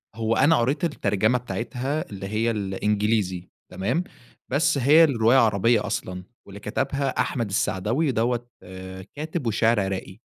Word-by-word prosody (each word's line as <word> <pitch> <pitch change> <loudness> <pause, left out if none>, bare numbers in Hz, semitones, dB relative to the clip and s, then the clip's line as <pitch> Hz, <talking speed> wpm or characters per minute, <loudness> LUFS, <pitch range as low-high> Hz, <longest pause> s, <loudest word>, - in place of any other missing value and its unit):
هو 115 0 0
أنا 160 +2 +4
قريت 135 +9 0
الترجمة 110 - +1
بتاعتها 125 +4 -4
اللي 95 -1 -7
هي 110 +3 0
الإنجليزي 100 -2 -1 0.2
تمام، 125 - -1 0.5
بس 145 +2 +2
هي 145 +5 +6
الرواية 120 -3 +4
عربية 115 0 +3
أصلًا 90 0 -4 0.2
واللي 100 +1 -11
كتبها 135 +6 -2
أحمد 115 -6 -2
السعداوي، 110 - 0
دوّة 120 +1 -1 0.7
كاتب 155 -2 -4
وشاعر 110 0 +2
عراقي. 95 -1 -3
115 Hz, 130 wpm, -24 LUFS, 100-135 Hz, 0.7 s, هي